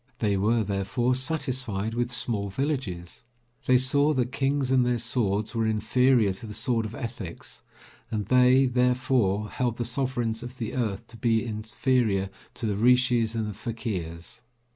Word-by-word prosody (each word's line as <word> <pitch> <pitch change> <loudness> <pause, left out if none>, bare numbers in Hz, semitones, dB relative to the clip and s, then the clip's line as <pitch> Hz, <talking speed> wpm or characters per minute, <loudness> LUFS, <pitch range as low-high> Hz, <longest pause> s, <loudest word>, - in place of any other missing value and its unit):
They 105 -3 +1
were, 110 +4 +2
therefore, 100 +5 0
satisfied 130 -7 -1
with 120 +1 -1
small 110 -4 -1
villages. 100 - -3 0.4
They 130 - +6
saw 140 +4 +3
that 125 -3 0
kings 135 -1 0
and 130 -1 +4
their 125 0 +1
swords 110 -3 -1
were 115 -1 0
inferior 110 0 +3
to 105 +4 -9
the 105 - -6
sword 115 0 0
of 110 - -9
ethics, 115 -9 -7 0.5
and 105 -2 -2
they, 125 +3 +5
therefore, 125 -5 +1
held 120 -2 -1
the 120 - -2
sovereigns 120 -2 -2
of 125 +1 -8
the 115 -3 -4
earth 115 -3 -2
to 115 0 -13
be 115 0 +1
inferior 110 -2 0 0.2
to 120 - -4
the 105 -2 -1
Rishis 120 -1 +3
and 110 -1 -1
the 105 - -4
Fakirs. 95 -7 -5
115 Hz, 160 wpm, -26 LUFS, 105-125 Hz, 0.5 s, They